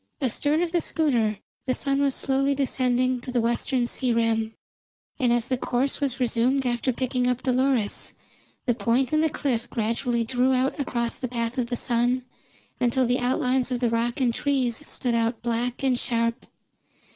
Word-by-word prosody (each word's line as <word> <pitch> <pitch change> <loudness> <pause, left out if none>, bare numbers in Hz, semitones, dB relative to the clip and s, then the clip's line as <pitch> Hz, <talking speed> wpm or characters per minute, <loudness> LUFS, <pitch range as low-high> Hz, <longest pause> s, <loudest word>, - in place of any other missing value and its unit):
Astern 290 +5 +1
of 345 - -2
the 345 -1 +2
schooner 235 -12 +1 0.3
the 255 - +1
sun 275 -1 0
was 275 -2 +2
slowly 275 +1 +1
descending 255 -2 +1
to 250 - -6
the 245 - +1
western 240 +2 +1
sea 250 +1 0
rim, 225 -1 +1 0.6
and 250 -3 +2
as 240 0 +2
the 255 -1 -1
course 260 +4 -1
was 270 -2 -1
resumed 250 +2 +1
after 240 +1 0
picking 250 0 -1
up 250 0 -1
Dolores, 255 -4 +1 0.5
the 245 - +2
Point 245 +3 +1
and 310 - +4
the 320 - +3
cliff 245 -5 -2
gradually 235 +1 0
drew 250 +3 +1
out 260 +4 0
across 235 -4 -1
the 255 - -3
path 235 0 -2
of 240 - 0
the 245 0 -2
sun, 245 +1 +1 0.5
until 250 +1 +2
the 245 +1 +1
outlines 255 0 +1
of 250 -2 -1
the 240 -2 +1
rock 235 +2 0
and 245 -3 +2
trees 260 -3 0
stood 245 -3 -1
out 230 0 0
black 240 +2 -1
and 255 -2 +2
sharp. 230 -1 -1
250 Hz, 180 wpm, -25 LUFS, 235-265 Hz, 0.6 s, and